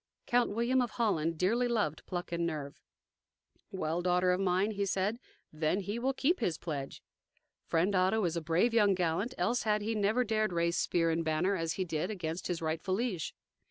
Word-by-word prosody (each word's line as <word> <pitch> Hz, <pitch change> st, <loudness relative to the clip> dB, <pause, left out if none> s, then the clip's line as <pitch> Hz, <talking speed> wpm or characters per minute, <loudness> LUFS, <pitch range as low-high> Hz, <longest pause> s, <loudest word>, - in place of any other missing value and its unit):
Count 245 Hz, 0 st, +2 dB
William 235 Hz, +4 st, +1 dB
of 245 Hz, -, 0 dB
Holland 165 Hz, -8 st, +1 dB
dearly 230 Hz, +8 st, +2 dB
loved 210 Hz, -11 st, -1 dB
pluck 175 Hz, -1 st, -4 dB
and 170 Hz, 0 st, -1 dB
nerve. 150 Hz, -4 st, -4 dB, 0.9 s
"Well, 175 Hz, -4 st, -2 dB
daughter 180 Hz, 0 st, +3 dB
mine," 190 Hz, +2 st, +1 dB
he 200 Hz, -1 st, -2 dB
said, 200 Hz, +3 st, 0 dB, 0.3 s
"then 155 Hz, +3 st, 0 dB
will 235 Hz, +6 st, -1 dB
he -, -, 0 dB
keep 340 Hz, +7 st, +2 dB
his 175 Hz, -9 st, 0 dB
pledge. 145 Hz, -5 st, -5 dB, 0.6 s
Friend 175 Hz, +5 st, +2 dB
Otto 190 Hz, +3 st, +2 dB
is 170 Hz, -1 st, -1 dB
a 170 Hz, -, -1 dB
brave 170 Hz, +9 st, +2 dB
young 205 Hz, -4 st, +4 dB
gallant, 180 Hz, +8 st, -1 dB
else 245 Hz, +1 st, +1 dB
had 210 Hz, -1 st, +1 dB
he 225 Hz, +2 st, -1 dB
never 215 Hz, +4 st, +2 dB
dared 215 Hz, -4 st, 0 dB
raised 170 Hz, 0 st, +1 dB
spear 165 Hz, -1 st, +1 dB
and 165 Hz, +1 st, 0 dB
banner, 160 Hz, +5 st, +1 dB
as 165 Hz, -2 st, -1 dB
he 190 Hz, -, -2 dB
did, 160 Hz, 0 st, -2 dB
against 170 Hz, -4 st, -4 dB
his 170 Hz, -2 st, -3 dB
rightful 160 Hz, +4 st, -1 dB
liege." 205 Hz, -7 st, -2 dB
185 Hz, 190 wpm, -32 LUFS, 165-215 Hz, 0.9 s, young